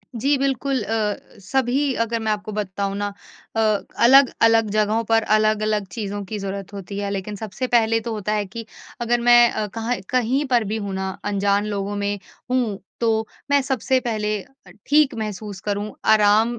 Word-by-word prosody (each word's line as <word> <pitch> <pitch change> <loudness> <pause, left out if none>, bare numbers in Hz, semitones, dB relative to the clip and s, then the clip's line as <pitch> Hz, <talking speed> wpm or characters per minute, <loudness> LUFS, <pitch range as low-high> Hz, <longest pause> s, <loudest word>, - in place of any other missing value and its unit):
जी, 275 +5 +2
बिल्कुल। 270 -1 0
अ, 215 -1 0 0.3
सभी 265 +5 +1
अगर 230 +1 -2
मैं 220 -1 -1
आपको 210 0 -3
बताऊँ 200 -1 -3
ना 205 0 -2 0.4
अ, - - +1 0.4
अलग-अलग 230 -4 +5
जगहों 215 +2 +1
पर 225 0 +2
अलग-अलग 215 -1 +1
चीज़ों 205 0 -4
की 210 +2 -5
ज़रूरत 195 0 -5
होती 200 0 -7
है। 200 0 -2
लेकिन 200 +1 -4
सबसे 220 +4 -4
पहले 225 -2 +3
तो 230 +1 -5
होता 210 -1 -2
है 210 -1 0
कि 225 +4 -8 0.4
अगर 240 +1 +1
मैं 240 0 +7
अ, 215 - -2
कहाँ 225 +4 -2
कहीं 255 +3 +1
पर 240 -2 +4
भी 220 - 0
हूँ 200 -3 -4
ना 190 0 -2 0.2
अनजान 200 0 +1
लोगों 205 -1 -3
में 205 0 -2 0.3
हूँ, 235 -6 0 0.2
तो 220 -1 +1 0.2
मैं 285 0 +5
सबसे 260 0 +1
पहले 215 -3 -1
अ, 270 -9 -21 0.2
ठीक 295 -1 +4
महसूस 210 -2 -5
करूँ 205 0 -3
आराम 220 +2 +4
215 Hz, 175 wpm, -22 LUFS, 205-240 Hz, 0.4 s, मैं